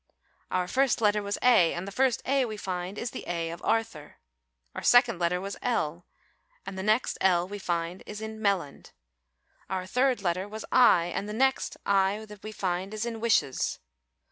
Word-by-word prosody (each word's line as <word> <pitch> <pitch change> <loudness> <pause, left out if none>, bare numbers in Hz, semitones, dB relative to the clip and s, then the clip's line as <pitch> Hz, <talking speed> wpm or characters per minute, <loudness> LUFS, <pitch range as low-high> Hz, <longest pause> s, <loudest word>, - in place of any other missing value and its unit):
Our 180 -1 0
first 265 +5 +2
letter 210 -1 +2
was 200 0 -3
A, 230 -10 +5
and 175 +3 -5
the - - -5
first 255 +3 +1
A 275 0 +2
we 215 -2 -6
find 185 0 -4
is 235 - -3
the - - -7
A 170 -1 -2
of 170 - -8
'Arthur.' 225 -10 -1 0.6
Our - - -5
second 245 -6 +5
letter 175 +1 +1
was 195 +2 -5
L, 175 -8 -1 0.6
and - - -6
the 190 - -4
next 215 +5 +1
L 180 -2 +3
that 190 - -14
we 205 - -5
find 175 -1 -2
is 210 - -6
in 220 0 -6
'Melland.' 195 -9 -2 0.8
Our 185 -1 -2
third 250 +1 +1
letter 180 +2 -1
was 215 +1 -7
I 240 -9 +6
and 205 - -3
the - - -4
next 265 +4 +1
I 200 +2 +2
that 210 -1 -12
we 215 - -7
find 190 0 -3
is 215 +2 -2
in 230 -1 -4
'wishes. 220 - +1
200 Hz, 195 wpm, -28 LUFS, 180-225 Hz, 0.8 s, I